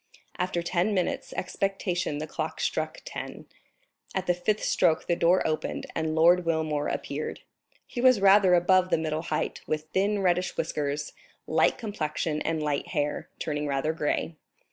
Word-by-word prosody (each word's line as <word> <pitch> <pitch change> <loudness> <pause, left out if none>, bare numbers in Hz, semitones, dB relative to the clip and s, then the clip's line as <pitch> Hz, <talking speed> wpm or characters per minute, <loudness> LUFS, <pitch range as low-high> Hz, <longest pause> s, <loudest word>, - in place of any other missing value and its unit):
After 180 -1 -1
ten 185 +4 +1
minutes' 185 - -1
expectation 185 -5 -2
the 155 - -3
clock 155 0 -4
struck 155 0 -2
ten; - - -7 0.7
at 190 -1 -1
the 180 - +3
fifth 205 +4 -1
stroke 160 0 +2
the 175 - +1
door 175 +2 +3
opened 155 -1 -2
and 160 -1 -1
Lord 175 +3 +5
Wilmore 160 -3 0
appeared. 145 +2 -4 0.4
He 240 - -5
was 255 -3 +6
rather 195 -2 +6
above 185 +1 +4
the - - +3
middle 155 -1 -2
height, 155 -2 -2
with 155 0 -2
thin 200 +1 +1
reddish 180 0 +1
whiskers, 145 0 -2 0.3
light - - +2
complexion 155 -7 -2
and 160 -1 -1
light 145 -2 -1
hair, 145 0 -2
turning 150 -1 -2
rather 140 +3 0
gray. 160 +1 -1
165 Hz, 155 wpm, -27 LUFS, 155-185 Hz, 0.7 s, was